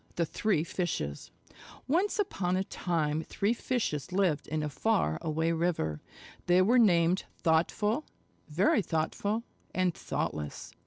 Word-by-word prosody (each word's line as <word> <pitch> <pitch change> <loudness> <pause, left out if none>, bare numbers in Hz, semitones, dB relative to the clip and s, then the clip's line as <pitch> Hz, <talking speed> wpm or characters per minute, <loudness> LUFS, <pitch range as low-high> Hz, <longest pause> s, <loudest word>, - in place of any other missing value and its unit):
THE 170 - +1
THREE 195 -2 0
FISHES 160 - -3 0.6
Once 365 +10 +1
upon 190 - 0
a 190 - +1
time 160 -5 -1
three 200 +6 0
Fishes 225 - -2
lived 180 -6 +1
in 155 0 -2
a - - -1
far 80 - +1
away 160 +1 0
river. 160 - -1 0.5
They 180 +1 +5
were 240 +6 +4
named 175 -4 +4
Thoughtful, 205 - +1 0.4
Very 180 +7 +3
Thoughtful, 200 +6 -1 0.3
and 185 -2 +2
Thoughtless. 75 - -4
175 Hz, 125 wpm, -30 LUFS, 155-205 Hz, 0.6 s, They